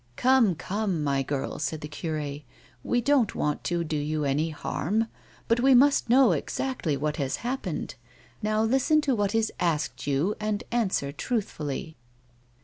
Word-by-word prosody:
" - - -35
Come, 245 - +4
come, 185 -1 -2
my 140 -1 +1
girl," 135 0 -3
said 155 +1 -2
the 150 - -5
cure, 150 -1 -4 0.2
" 120 - -28
we 245 - +3
don't 260 -4 +2
want 150 -1 -1
to 175 -1 0
do 155 -1 -3
you 150 +1 -1
any 145 +4 +1
harm, 180 +7 -1 0.4
but 230 +1 +3
we 265 +1 +5
must 275 -1 +4
know 250 -2 +6
exactly 170 - -2
what 150 +2 -2
has 135 -2 -1
happened. 245 - -3 0.5
Now 215 +1 +1
listen 270 +6 +3
to 280 -3 +1
what 205 -2 0
is 225 -1 +1
asked 160 -5 -1
you 145 +8 +1
and 210 -1 -1
answer 195 -12 0
truthfully." 160 - -3
180 Hz, 165 wpm, -27 LUFS, 150-235 Hz, 0.5 s, know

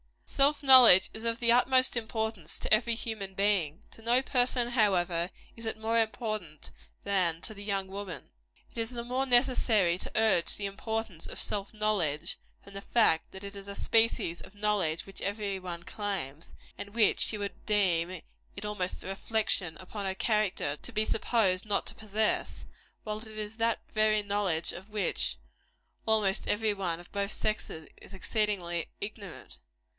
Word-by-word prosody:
Self 285 +1 +2
knowledge 250 -9 +9
is 220 - -8
of 230 +1 0
the 235 -2 +3
utmost 255 +2 +3
importance 220 -6 -3
to - - 0
every 230 +2 +3
human 210 -4 -5
being. 195 -3 +1
To - - -13
no 240 +3 +2
person, 245 -2 +1
however, 180 -7 +2 0.3
is 230 -1 -7
it 220 - -1
more 225 +1 +1
important 215 - -3 0.3
than 180 -5 +2
to 220 - -4
the 200 -1 -10
young 195 -2 -1
woman. 190 -7 -7 0.4
It - - -7
is 225 0 -1
the 240 -1 -5
more 255 +3 -1
necessary 235 -8 +3
to - - -6
urge 215 -6 +3
the 205 - -4
importance 200 -3 -4
of - - -5
self 200 -1 -2
knowledge, 185 -7 0 0.2
from 200 - -14
the 195 - -6
fact 200 -8 +2
that 190 +1 -10
it 200 0 -7
is 200 0 -9
a 200 - -6
species 225 -8 +1
of 205 - -12
knowledge 200 -6 0
which 195 - -11
every 200 -1 -2
one 175 -2 -7
claims, 180 -9 -4 0.3
and 200 +1 -8
which 220 -3 +4
she 215 - +2
would 200 -1 -6
deem 185 -4 +1 0.3
it 200 - -7
almost 200 -3 -3
a - - -8
reflection 195 -3 -1
upon 195 +2 -5
her 190 - -2
character 205 -9 0
to - - -9
be 215 - 0
supposed 210 -4 +1
not 205 -1 +1
to - - -6
possess; 215 0 -1 0.4
while 215 0 -3
it 220 - -10
is 215 0 -6
that 230 0 0
very 215 -1 +2
knowledge 200 -5 0
of 190 +4 -9
which 205 - 0 0.7
almost 215 -3 +2
every 215 0 +1
one, 180 -4 -2
of 175 - -14
both 200 0 -2
sexes, 215 -7 -3
is - - -11
exceedingly 190 -4 -1
ignorant. 205 -3 -8
205 Hz, 170 wpm, -29 LUFS, 185-220 Hz, 0.7 s, knowledge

